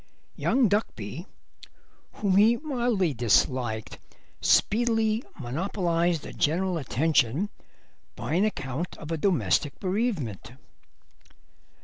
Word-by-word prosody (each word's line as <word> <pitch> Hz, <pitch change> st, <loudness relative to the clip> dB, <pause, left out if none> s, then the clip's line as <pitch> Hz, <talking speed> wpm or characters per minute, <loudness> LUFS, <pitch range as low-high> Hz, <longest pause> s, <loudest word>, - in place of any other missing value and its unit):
Young 255 Hz, -2 st, +2 dB
Duckby, 170 Hz, -, -2 dB, 0.9 s
whom 200 Hz, -3 st, 0 dB
he 220 Hz, +4 st, +5 dB
mildly 240 Hz, -, 0 dB
disliked, 120 Hz, -1 st, +1 dB, 0.4 s
speedily 225 Hz, 0 st, +2 dB, 0.2 s
monopolised 170 Hz, -, -1 dB
the -, -, -8 dB
general 175 Hz, +3 st, 0 dB
attention 150 Hz, -, +1 dB, 0.6 s
by -, -, -4 dB
an 180 Hz, +4 st, +3 dB
account 160 Hz, -5 st, -3 dB
of 155 Hz, +1 st, -8 dB
a 165 Hz, -, 0 dB
domestic 160 Hz, -4 st, +1 dB
bereavement. 180 Hz, -, -2 dB
175 Hz, 90 wpm, -27 LUFS, 135-210 Hz, 0.9 s, he